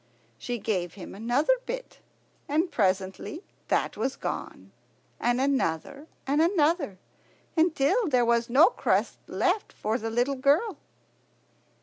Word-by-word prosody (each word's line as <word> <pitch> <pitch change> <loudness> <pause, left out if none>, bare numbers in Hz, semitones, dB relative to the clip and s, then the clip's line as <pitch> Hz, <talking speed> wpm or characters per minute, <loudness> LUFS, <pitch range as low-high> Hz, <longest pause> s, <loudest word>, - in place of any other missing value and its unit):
She 245 - -3
gave 185 -5 -2
him 190 - -9
another 240 - +2
bit, - - -6 0.5
and 320 +5 +1
presently 190 - -1 0.2
that - - 0
was - - -2
gone, - - -6 0.5
and 240 +1 +1
another 275 - -1 0.2
and 285 +3 +2
another, 320 - +2 0.6
until 330 - +2
there 250 -5 +3
was 235 0 +2
no 295 - +7
crust - - 0
left 390 +3 0
for 220 +3 -2
the 225 - -3
little 245 +4 +1
girl. 285 - +2
270 Hz, 120 wpm, -27 LUFS, 225-320 Hz, 0.6 s, no